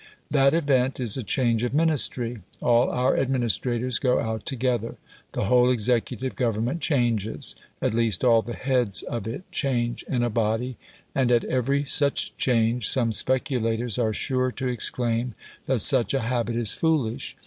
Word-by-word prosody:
That 140 +1 +3
event 135 -5 +1
is 120 -5 -1
a 130 - -3
change 115 +1 0
of 125 +2 -2
Ministry. 135 -6 +1 0.2
All 120 0 +3
our 125 +1 +1
administrators 125 -1 0
go 125 -2 +1
out 110 -1 -4
together. 125 -3 -2 0.4
The - - -2
whole 125 +4 +4
executive 125 +1 -1
Government 120 +5 -1
changes 120 - +1 0.3
at - - +1
least, 115 -4 0
all 115 -2 +5
the 120 +1 -7
heads 125 -6 0
of 115 -3 -5
it 120 +10 -6
change 120 -4 -1
in 125 -3 0
a 120 - 0
body, 115 +3 -1 0.4
and 130 -2 +1
at 120 -1 +3
every 135 +3 0
such 140 0 0
change 115 -2 +1
some 120 -3 +3
speculators 120 -2 0
are 110 -2 +1
sure 130 +3 0
to 130 - -4
exclaim 120 -1 0 0.3
that 130 -5 +1
such 125 -4 +4
a 135 - 0
habit 120 0 -2
is 115 -3 +2
foolish. 145 -9 -1
125 Hz, 160 wpm, -24 LUFS, 115-130 Hz, 0.4 s, all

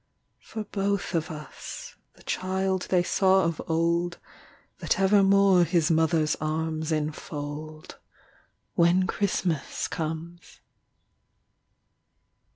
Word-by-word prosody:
For 220 - -6
both 200 -2 -2
of 160 -2 -1
us 160 - -8 0.2
the - - -19
child 190 0 -1
they 180 -2 +3
saw 190 +1 +3
of 165 -2 -1
old, 170 +1 +1 0.6
That - - 0
evermore 195 -1 +5
his 170 0 +2
mother's 160 -1 +2
arms 160 0 -2
enfold, 155 0 -5 0.7
When 175 +2 +4
Christmas 185 -6 -1
comes. 165 +2 -6
170 Hz, 90 wpm, -27 LUFS, 155-190 Hz, 0.7 s, evermore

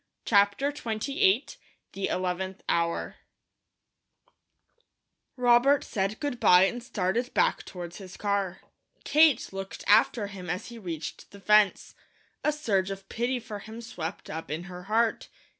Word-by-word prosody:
CHAPTER 205 +6 +3
XXVIII 290 - +1 0.5
THE 195 - -3
ELEVENTH 185 +1 -3
HOUR 170 0 -1 2.2
ROBERT 250 +3 +4
said 195 +1 -2
good 285 -5 -3
bye 180 -4 +7
and 240 +5 0
started 235 +1 -1
back - - +2
toward 175 -2 -8
his 190 -3 -10
car. 200 -2 -1 0.4
Kate 305 -8 +4
looked 195 0 -6
after 215 +1 +4
him 190 -3 -8
as 180 +7 -3
he 235 -1 -10
reached 165 -6 -6
the 200 - -13
fence. 210 -1 +3 0.5
A 300 - +3
surge 200 -11 0
of 195 0 -7
pity 245 +2 -1
for 220 -3 -7
him 220 +3 -10
swept 180 -7 -6
up 160 +1 -6
in 155 +3 -3
her 180 -1 -9
heart. 225 +2 +1
200 Hz, 135 wpm, -28 LUFS, 185-240 Hz, 2.2 s, bye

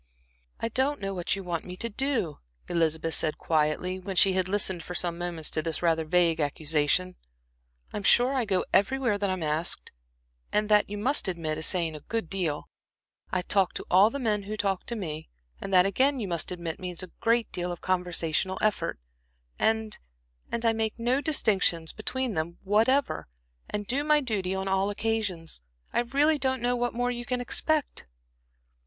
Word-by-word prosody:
"I 230 - -1
don't 265 +5 0
know 195 0 -3
what 180 0 -1
you 195 - -6
want 175 -2 -3
me 180 0 -8
to 235 - -1
do," 230 - -1 0.3
Elizabeth 165 -1 0
said, 155 -1 +1
quietly, 160 +4 0
when 190 +1 -5
she 190 +1 +5
had 185 0 0
listened 190 -3 +2
for 180 - -7
some 175 -1 0
moments 170 -2 -2
to 155 - 0
this 165 +1 -1
rather 165 -1 +2
vague 170 0 +3
accusation. 155 +4 +1 0.8
"I'm 210 - -3
sure 245 +6 +4
I 255 -3 +1
go 190 -3 0
everywhere 215 +1 +2
that 200 -1 0
I'm 185 -3 -2
asked, 155 - +1 0.6
and 210 0 +1
that, 210 -1 +4
you 205 - -4
must 255 +3 +2
admit, 160 -4 -2
is 160 - +3
saying 170 -4 0
a - - -7
good 225 +3 -4
deal; 170 -7 -2 0.6
I 185 -1 0
talk 195 -1 +2
to - - -4
all 190 +4 +7
the 280 - -4
men 215 -6 0
who 215 - -3
talk 195 -3 -1
to 235 - -3
me, 160 -7 -5 0.3
and 195 - -5
that 180 -1 +6
again 260 +8 +2
you 210 - -3
must 170 -1 -1
admit, 170 -2 -5
means 180 -1 -4
a 185 - -9
great 230 -1 +2
deal 180 0 -3
of 175 - -7
conversational 180 0 0
effort; 215 - 0 0.6
and 220 -1 0 0.5
and 235 0 -2
I 225 - +4
make 220 -1 -1
no 245 +4 +1
distinctions 195 - +2
between 250 +2 -2
them 170 +1 -3
whatever, 225 +8 +2 0.4
and 205 0 -3
do 270 +7 0
my 300 0 +5
duty 200 -8 -2
on 190 0 -3
all 195 +1 +1
occasions. 205 - -2 0.3
I - - +2
really 285 +6 +3
don't 260 -1 0
know 245 0 +2
what 245 -1 -1
more 245 +1 0
you 240 0 -4
can 250 +1 -2
expect." 300 - -1
195 Hz, 185 wpm, -28 LUFS, 170-230 Hz, 0.8 s, all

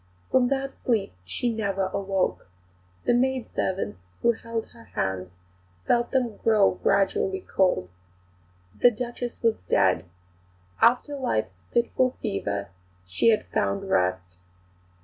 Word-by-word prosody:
From 255 -1 +4
that 275 +1 -1
sleep 220 - -1
she 235 - -1
never 195 -3 -1
awoke. 195 - -1 0.6
The - - +4
maidservants 245 - -1 0.2
who 235 - +6
held 230 0 -5
her 115 - -15
hands 90 -1 -3 0.5
felt 240 0 +2
them 245 -5 0
grow 215 -3 +4
gradually 380 - +2
cold. 180 - +1 0.9
The 245 - +8
Duchess 240 +1 -5
was 230 -1 +2
dead. 95 0 +2 0.8
After 250 +5 +4
life's 110 - -2
fitful 250 +2 +1
fever, 100 - -2 0.4
she 90 - 0
had 215 -2 +3
found 195 -1 -1
rest. 90 - 0
215 Hz, 115 wpm, -26 LUFS, -, 0.9 s, The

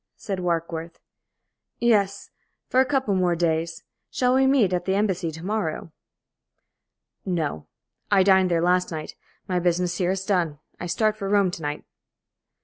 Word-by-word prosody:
said 195 -2 -4
Warkworth. 170 -1 -3 0.8
"Yes, 200 -4 +1 0.4
for 255 - +2
a 260 - +5
couple 265 -7 +1
more 180 -2 +2
days. 165 0 -1 0.3
Shall 250 0 +1
we 265 +1 +4
meet 245 -9 +3
at 175 0 -1
the 190 - +1
Embassy 190 -5 0
to 160 +2 -8
morrow?" 195 -6 -2 1.3
"No. 160 - -2 0.4
I 195 -2 +5
dined 190 -1 +4
there 170 -1 +1
last 180 +1 +2
night. 155 -1 -5 0.3
My 180 -2 0
business 175 0 0
here 180 -1 +1
is 190 0 -2
done. 175 -7 0 0.2
I 175 - -4
start 215 +4 +1
for 195 -2 -4
Rome 200 -3 +3
to 170 - -7
night." 145 0 -4
180 Hz, 155 wpm, -24 LUFS, 170-200 Hz, 1.3 s, a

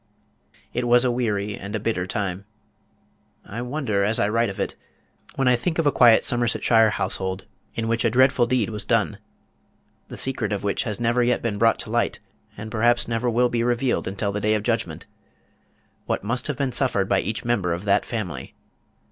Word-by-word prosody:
It 120 0 -1
was 120 +1 +5
a 125 - +2
weary 105 -4 -1
and 100 +2 -6
a - - -1
bitter 100 -4 -2
time. 100 -2 -3 1.0
I 115 +4 -6
wonder, 125 -6 -1
as 105 +3 +1
I 100 - +1
write 115 +1 +1
of 95 - -7
it, - - -2 0.6
when 135 -1 +1
I 125 - +5
think 160 +7 -2
of 165 - +1
a 145 - +4
quiet 120 -4 +5
Somersetshire 115 -2 +3
household 95 -2 -2 0.3
in 115 -1 -2
which 115 0 0
a 115 - +3
dreadful 130 +1 +3
deed 120 -3 0
was 105 -2 -3
done - - 0 0.9
the - - -9
secret 125 -6 -1
of 100 - -3
which 100 - -1
has 105 -1 -3
never 120 +1 +2
yet 120 0 +1
been 105 -3 -2
brought 115 0 +4
to - - -8
light, - - 0 0.4
and 110 +1 -7
perhaps 120 +2 +2
never 115 +1 0
will 120 +1 +2
be 120 -1 0
revealed 120 +1 0
until 100 +2 -2
the 105 +1 -3
Day 105 +1 +2
of 105 - -2
Judgment 115 -9 -2 1.0
what - - -1
must 120 +4 -1
have 150 - -3
been 140 -2 -1
suffered 120 -6 +1
by 95 - +2
each 110 +4 -3
member 105 -7 0
of 85 +3 -3
that 100 0 +3
family? 90 - -5
115 Hz, 200 wpm, -23 LUFS, 100-120 Hz, 1.0 s, was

